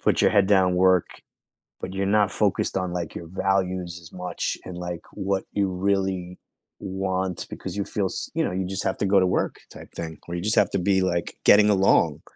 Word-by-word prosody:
put - - +2
your - - +5
head 100 -2 +4
down, 95 -3 +3
work, 95 -1 +4 0.7
but 95 - -6
you're 95 0 -1
not 105 -1 +3
focused 105 -2 0
on 95 -2 -1
like 85 -3 -4
your 85 - -7
values 95 -1 -1
as 80 - -14
much 90 0 -3
and 90 - -7
like 90 -1 -5
what 100 -1 -1
you 100 -2 0
really 95 -1 -1 0.4
want 95 -2 -3
because - - -7
you 100 - 0
feel, 100 -2 -2
s - - -4
you - - +1
know, - - -1
you 95 0 -2
just 95 +1 -3
have - - -1
to - - -1
go 100 0 +4
to 95 - +3
work 90 - 0
type - - -12
thing. 80 -1 -6
Or 85 - -6
you 85 - -3
just 105 +4 +2
have 105 -4 +3
to 100 - 0
be 95 +1 +2
like 85 -2 -1
getting 105 0 +7
along. 95 -1 +3
95 Hz, 220 wpm, -24 LUFS, 90-100 Hz, 0.7 s, getting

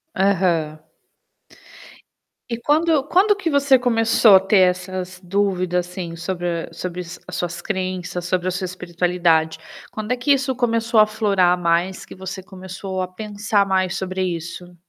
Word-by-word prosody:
Aham. 175 -5 +1 1.7
E 235 - -1
quando 300 +2 +2
quando 390 +7 +3
que 380 -3 -5
você 280 -3 +4
começou 230 -3 +4
a - - +4
ter 195 +2 +2
essas 180 0 -6
dúvidas, 180 -2 0
assim, 180 -2 -6
sobre 175 -1 -3
a - - -17
sobre 180 +1 -5
as 175 0 -9
as - - -6
suas 170 -1 -3
crenças, 185 -2 -3
sobre 180 0 -1
a - - +1
sua 185 +1 -3
espiritualidade? 175 -2 0 0.3
Quando 215 +1 -5
é 250 - -3
que 285 +4 +1
isso 270 -1 -1
começou 230 -2 +1
aflorar 210 -4 +3
mais, 175 +2 0
que - - -11
você 190 +1 -7
começou 190 0 -6
a 185 - -3
pensar 205 +1 -1
mais 185 -1 +1
sobre 185 0 -3
isso? 175 0 -5
185 Hz, 155 wpm, -21 LUFS, 180-215 Hz, 1.7 s, você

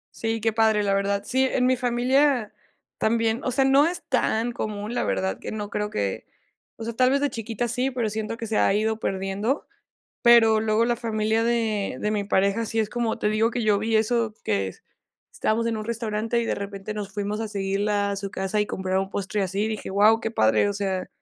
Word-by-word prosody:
Sí, 225 -1 -2
qué 225 -1 +1
padre, 220 -2 +3
la 200 -1 +1
verdad. 200 0 0
Sí, 260 +3 +1
en 260 -1 +1
mi 255 0 +4
familia 250 -1 +1 0.5
también. 225 +1 +1
O - - 0
sea, 265 +2 +2
no 275 +3 +5
es 350 0 -4
tan 240 -2 +1
común, 210 -1 -4
la - - 0
verdad, 95 -1 -1
que - - -6
no 210 -1 -5
creo 210 0 -2
que 100 - -3 0.5
o 225 - -8
sea, 230 +1 -4
tal 255 +1 +4
vez 280 - +2
de 285 -2 0
chiquita 225 +1 -3
sí, 250 +3 0
pero 240 -4 -1
siento 220 +1 -4
que 230 - -5
se 220 0 -1
ha - - +4
ido 220 +1 0
perdiendo. 195 +8 -2 0.6
Pero 230 -2 +6
luego 215 +1 +2
la 240 0 +1
familia 220 -1 0
de 220 - 0
de 210 - 0
mi 205 -1 -1
pareja 200 +3 +1
sí 225 - -4
es 215 -1 0
como 235 -1 -1
te 210 - 0
digo, 220 +2 +2
que 235 -1 -2
yo 210 -2 +3
vi 220 +1 0
eso, 220 0 +1
que 95 -1 -1 0.6
estábamos 225 +2 0
en 230 -1 -1
un 215 - -5
restaurante 230 0 -1
y, - - -2
de - - -1
repente, 200 +1 -6
nos 205 -2 -5
fuimos 205 +1 -3
a 225 - -2
seguirla 200 0 -1
a - - -2
su 195 0 -4
casa 195 +2 -2
y 210 - +2
comprar 190 -2 -2
un 190 0 -3
postre, 200 +1 -2
así. 195 +3 -1
Dije: 215 - -5
"Guau, 215 +3 +5
qué 225 - -3
padre". 110 - +3
O 205 - -1
sea, 190 -2 -2
220 Hz, 225 wpm, -25 LUFS, 200-230 Hz, 0.6 s, Pero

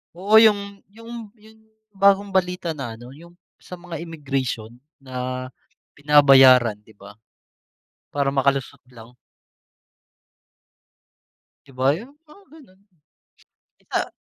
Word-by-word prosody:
Oo 205 +5 +4
yung 200 -2 +2 0.2
yung 230 -1 -10
yung 220 +1 -20 0.3
bagong 200 0 +2
balita 180 -2 -1
na 125 -7 -7
ano, 120 +2 -13
yung 170 +5 -16 0.2
sa 180 - -11
mga 175 -2 -9
immigration 135 -8 -5 0.2
na 130 -1 -6 0.4
binabayaran, 135 -6 +5
'di 110 0 -22
ba? 100 +2 -16 0.9
Para 140 -1 -2
makalusot 135 -1 -1
lang. 120 -1 -15 2.5
'Di 135 - -19
ba 135 +4 +1
yung 245 +9 -12 0.2
mga 395 +6 -18
ganun. 200 -11 -20 1.1
Sa - - -2
150 Hz, 105 wpm, -21 LUFS, 130-200 Hz, 2.5 s, binabayaran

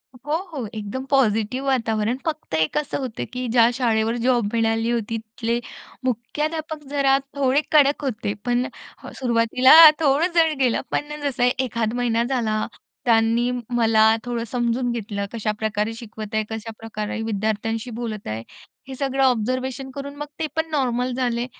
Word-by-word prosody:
हो, 280 +4 -5 0.2
हो. 265 -8 -4
एकदम 215 +4 -5
पॉझिटिव्ह 255 0 +1
वातावरण 230 -3 +1
फक्त 310 - -4
एक 160 - +1
असं 300 -1 -1
होतं, 255 -5 -4
की 250 0 -3
ज्या 230 -1 +5
शाळेवर 230 -2 +1
जॉब 245 -3 +3
मिळाली 225 0 +1
होती, 230 -1 -1
तिथले 230 +1 -3 0.4
मुख्याध्यापक 300 +6 -3
जरा 275 -1 +3 0.2
थोडे 275 +1 +2
कडक 290 -1 +4
होते, 235 -6 -2
पण 245 0 +1 0.4
अ, - - -8
सुरुवातीला 245 +1 +4 0.3
थोडं 310 +3 +2
जड 320 -3 +3
गेलं, 250 -3 +2
पण 295 +1 -3
जसं 250 -3 +2
एखाद 230 -3 -1
महिना 235 -1 +1
झाला. 230 -4 0 0.4
त्यांनी 230 +1 +3 0.3
मला 225 -2 +3 0.2
थोडं 240 -1 -3
समजून 240 +1 0
घेतलं 210 -3 -3
कशा 220 -2 -1
प्रकार, 215 0 -1
शिकवत 220 -2 -8
आहे, 220 - +2
कशा 225 0 -5
प्रकारे 220 -1 -4
विद्यार्थ्यांशी 220 +2 -2
बोलत 220 -4 -5
आहे 110 +1 -4 0.4
हे 265 - -7
सगळं 270 0 0
ऑब्झर्वेशन 255 +2 0
करून 280 0 -6
मग 295 +1 -5
ते 320 - 0
पण 320 0 -1
नॉर्मल 250 -3 0
झाले. 245 -1 -1
240 Hz, 155 wpm, -23 LUFS, 225-270 Hz, 0.4 s, ज्या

